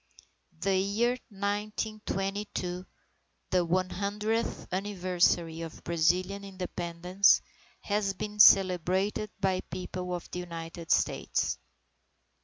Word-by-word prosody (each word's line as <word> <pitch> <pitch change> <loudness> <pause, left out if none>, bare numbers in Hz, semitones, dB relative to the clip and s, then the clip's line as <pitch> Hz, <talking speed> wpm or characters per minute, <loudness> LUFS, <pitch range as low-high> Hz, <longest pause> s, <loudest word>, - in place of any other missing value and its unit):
The 195 +1 +2
year 205 +5 +2 0.2
1922, 200 -2 -3 0.6
the 180 -1 +3
one 185 +2 0
hundredth 210 +3 -1
anniversary 180 -4 +1
of 165 -1 -8
Brazilian 180 +4 +1
Independence, 180 0 +2 0.4
has 205 -1 0
been 210 +1 -5
celebrated 190 +2 +5
by 190 -1 +1
People 180 0 -4
of 175 - -7
the 180 - -4
United 165 -1 -7
States. - - +1
185 Hz, 90 wpm, -29 LUFS, 180-200 Hz, 0.6 s, celebrated